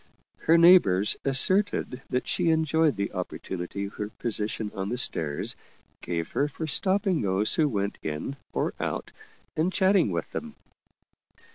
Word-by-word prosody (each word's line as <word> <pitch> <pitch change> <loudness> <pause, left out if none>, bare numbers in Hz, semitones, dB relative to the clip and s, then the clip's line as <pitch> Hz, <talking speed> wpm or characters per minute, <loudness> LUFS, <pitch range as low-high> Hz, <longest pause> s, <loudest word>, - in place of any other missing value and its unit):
Her 165 +1 +4
neighbors 165 - +6
asserted 135 0 +3
that 125 0 -2
she 170 - +1
enjoyed 160 -1 +2
the 100 0 -3
oppor 90 -2 -5
tunity 95 +2 -5
her 105 0 -5
position 110 -1 -3
on 95 0 -4
the 120 - -2
stairs 80 - -1 0.5
gave 85 -2 -3
her 145 - 0
for 155 +2 -6
stopping 190 +2 +1
those 100 +2 +1
who 155 -2 +2
went 100 -4 -3
in 80 - -4 0.2
or - - -2
out, - - -4 0.4
and 165 +4 0
chatting 190 - +3
with 85 -3 -4
them. - - -6
125 Hz, 145 wpm, -26 LUFS, 100-160 Hz, 0.5 s, neighbors